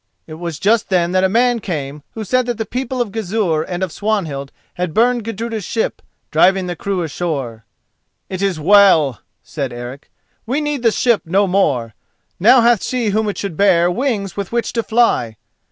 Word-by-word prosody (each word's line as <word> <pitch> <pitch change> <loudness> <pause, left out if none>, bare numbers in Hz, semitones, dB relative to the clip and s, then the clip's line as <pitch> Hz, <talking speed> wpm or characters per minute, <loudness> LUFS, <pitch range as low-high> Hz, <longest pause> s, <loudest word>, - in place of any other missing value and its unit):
It 155 - -10
was 170 -3 -4
just 215 +3 +1
then 175 -2 +1
that 185 0 +2
a 190 - +3
man 240 +3 +2
came 150 -7 -5
who 220 - -4
said 255 +4 +1
that 240 -2 -2
the 220 - -3
people 255 +3 -3
of 215 - -11
Gizur 195 -6 -1
and 175 +3 -4
of 185 - -2
Swanhild 160 -11 -2 0.2
had 180 -3 -4
burned 240 +1 +3
Gudruda's 225 0 -4
ship, 225 +4 -2 0.3
driving 190 0 +3
the 175 -1 -4
crew 190 0 -2
ashore. 140 -8 -4 0.6
"It 185 0 -5
is 195 -5 0
well," 165 - +5 0.2
said 140 -5 -4
Eric. 120 +3 -8 0.4
"We 265 +5 0
need 295 -3 -2
the 235 - +4
ship 235 0 +2
no 195 +5 +2
more; 140 - 0 0.5
now 240 +6 +6
hath 235 -3 +3
she 245 -4 -1
whom 215 +1 0
it 205 - -5
should 195 -5 -4
bear 175 -2 +3
wings 205 -3 -2
with 200 -2 -5
which 235 0 -1
to 230 - 0
fly." 220 - +1
195 Hz, 185 wpm, -18 LUFS, 165-230 Hz, 0.6 s, now